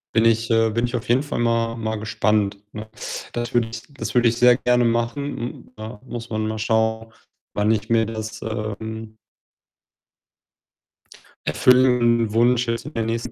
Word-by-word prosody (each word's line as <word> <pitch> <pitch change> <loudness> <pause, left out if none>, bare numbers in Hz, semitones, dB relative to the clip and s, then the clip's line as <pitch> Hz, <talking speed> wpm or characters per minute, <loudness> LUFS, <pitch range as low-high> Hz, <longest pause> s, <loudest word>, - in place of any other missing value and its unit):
Bin 115 - +4
ich 115 0 +3
äh, 115 0 +4
bin 115 +2 0
ich 120 +1 -3
auf 125 +1 -4
jeden 125 +4 +3
Fall 145 - -4
mal 115 0 +1
mal 110 -1 -2
gespannt, 105 -1 0 0.2
ne? 110 0 -7 0.4
Das 120 0 -4
würde 120 -2 +2
ich 115 0 -7
das 140 - -5
würde 120 -1 +4
ich 115 - +2
sehr 125 0 +6
gerne 125 -1 +2
machen. 120 +4 -1
Hm, 120 +1 -7
da 110 +1 -8
muss 120 -1 -7
man 110 0 -1
mal 110 0 -3
schauen, 110 0 0 0.4
wann 105 +1 +2
ich 110 0 -1
mir 115 -1 +3
das, 110 0 -6
ähm 110 0 -5 2.3
erfüllen 120 -3 +4
Wunsch 120 +1 +3
jetzt 115 +3 -2
in 150 - -8
der 115 - -1
nächsten 115 +1 -3
115 Hz, 170 wpm, -22 LUFS, 110-120 Hz, 2.3 s, sehr